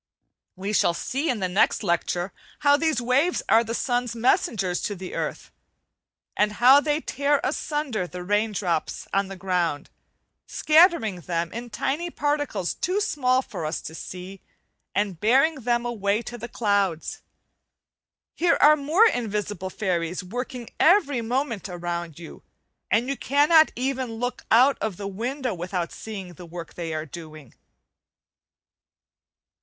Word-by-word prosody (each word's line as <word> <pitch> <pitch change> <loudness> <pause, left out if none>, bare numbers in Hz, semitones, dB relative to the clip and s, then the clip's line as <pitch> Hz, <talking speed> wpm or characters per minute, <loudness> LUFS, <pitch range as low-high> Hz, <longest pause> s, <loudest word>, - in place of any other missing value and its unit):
We 195 +3 -4
shall 170 -4 +3
see 275 - -2
in 235 -5 -1
the 185 - +1
next 190 +4 +2
lecture 175 0 -1 0.3
how 285 -1 +5
these 315 0 +1
waves 260 +9 +1
are 225 +1 +5
the 230 0 -4
sun's 245 -2 -1
messengers 205 -6 +1
to 205 - -2
the 185 0 -8
earth, - - -4 0.8
and 210 0 +2
how 255 +6 +7
they 295 +1 0
tear 285 -1 +1
asunder 275 - -2
the 180 0 -7
rain 205 +3 +1
drops 175 -6 -2
on 195 0 +1
the 195 - -7
ground, 180 -5 -1 0.6
scattering 305 - +4
them 170 0 -2
in 240 +2 -6
tiny 305 +9 -2
particles 290 - -1
too 370 +4 -1
small 260 -9 +1
for - - -7
us 155 +2 -2
to 160 - -8
see, 185 +3 -8 0.5
and 200 -5 -1
bearing 265 +9 +4
them 240 0 0
away 215 -2 0
to 240 - -7
the 235 0 -7
clouds. 200 -8 0 1.1
Here 345 0 +2
are 305 +1 +7
more 310 +9 +4
invisible 210 - -1
fairies 180 -3 -2
working 245 +4 -6
every 300 - +4
moment 230 -3 -2
around 175 -2 -4
you, 170 -1 -11 0.5
and 235 +3 +2
you 275 - -1
cannot 295 +5 +4
even 260 -1 -2
look 245 +2 -4
out 255 +5 +5
of 210 -5 -2
the 200 - -5
window 245 +5 -3
without 175 0 -3
seeing 195 -5 -8
the 175 +2 -11
work 170 0 -8
they 170 -2 -5
are 155 0 -3
doing. 155 -4 -11
220 Hz, 145 wpm, -25 LUFS, 180-270 Hz, 1.1 s, how